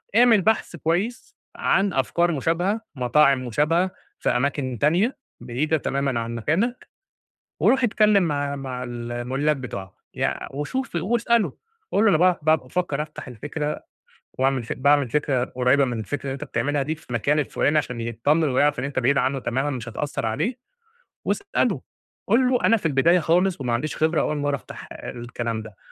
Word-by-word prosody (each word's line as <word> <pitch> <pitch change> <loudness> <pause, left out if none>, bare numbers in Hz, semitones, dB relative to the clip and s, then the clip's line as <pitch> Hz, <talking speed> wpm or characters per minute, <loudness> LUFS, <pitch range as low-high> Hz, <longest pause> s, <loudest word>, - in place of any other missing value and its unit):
اعمل 230 -3 +6
بحث 220 -2 +1
كويس 180 - -2 0.2
عن 195 -1 +1
أفكار 170 +6 +1
مشابهة، 175 - 0
مطاعم 130 +1 +3
مشابهة 160 +9 +1 0.3
في - - 0
أماكن 130 0 0
تانية 185 - +2 0.2
بعيدة 135 +7 0
تمامًا 135 -3 -1
عن 115 0 -4
مكانك 195 - -1 0.7
وروح 265 0 +3
اتكلِّم 210 -4 +4
مع 145 -3 -1
مع 130 -2 -5
المُلّاك 120 +4 -2
بتوعها، 100 -8 -7 0.2
يع - - -1
وشوف 175 - -3
واسأله، 230 +5 +1 0.4
قُل 205 - +3
له 220 - +6
أنا 160 - +4
باع 180 +1 +3
ب - - -18
بافكّر 155 0 +1
أفتح 150 -2 -8
الفكرة 150 +5 -4 0.6
واعمل 130 -1 +2
فك 115 - -5
باعمل 140 -2 +3
فكرة 135 -3 +1
قريبة 130 +3 +2
من 120 -2 -3
الفكرة 140 +6 -4
اللي 135 - -2
أنت 135 - -6
بتعملها 140 +5 -1
دي 155 +4 -2
في 155 -5 -19
المكان 140 +6 +1
الفُلاني 150 +1 +1
عشان 125 -5 -3
يتطمن 140 +7 +1
ويعرف 145 +3 +2
إن 125 - -3
أنت 140 -1 -3
بعيد 135 +3 +3
عنّه 135 +1 +1
تمامًا 135 +4 -1
مش 120 -4 -5
هتأثّر 140 0 -3
عليه 215 - -1 0.7
واسأله، 400 0 0 0.5
قُل 250 +2 +4
له 250 -1 +1
أنا 230 - +5
في 195 - -3
البداية 160 +5 +4
خالص 175 +1 +2
وما 125 -2 -1
عنديش 135 +5 -2
خبرة 160 +1 +2
أول 150 - 0
مرّة 145 0 0
أفتح - - -11
الكلام 120 -2 -5
ده. 105 -3 -12
145 Hz, 165 wpm, -24 LUFS, 125-175 Hz, 0.7 s, اعمل